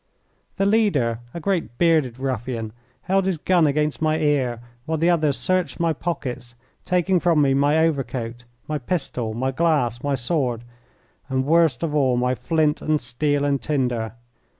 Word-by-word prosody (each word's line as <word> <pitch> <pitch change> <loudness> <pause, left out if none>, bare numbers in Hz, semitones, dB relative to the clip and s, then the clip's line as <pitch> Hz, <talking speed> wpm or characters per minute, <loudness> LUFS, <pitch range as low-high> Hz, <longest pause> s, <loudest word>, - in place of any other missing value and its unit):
The 195 - 0
leader, 190 - +2
a 170 - -6
great, 170 -9 -2
bearded 155 -8 +2
ruffian, 120 -4 -3 0.3
held 190 +1 +1
his 185 -3 0
gun 170 0 +3
against 150 +1 0
my 155 0 +2
ear 140 -6 +1 0.3
while 160 0 0
the 165 +3 +3
others 155 -6 +1
searched 180 +1 -1
my 165 -1 +2
pockets, 130 -7 -5 0.3
taking 180 0 +2
from 170 -3 +2
me 140 -2 +3
my 145 +3 +3
overcoat, 125 -7 -1 0.2
my 150 -1 -2
pistol, 125 -7 -3
my 130 +3 -1
glass, 135 -6 +1
my 145 -1 +1
sword, 125 -2 -1 0.7
and, 130 0 0
worst 160 -4 +3
of 160 -3 -1
all, 130 -4 +2
my 125 +1 +1
flint 150 +5 0
and 155 -1 +1
steel 145 +3 0
and 140 -1 0
tinder. 125 -7 -1
145 Hz, 160 wpm, -23 LUFS, 125-165 Hz, 0.7 s, gun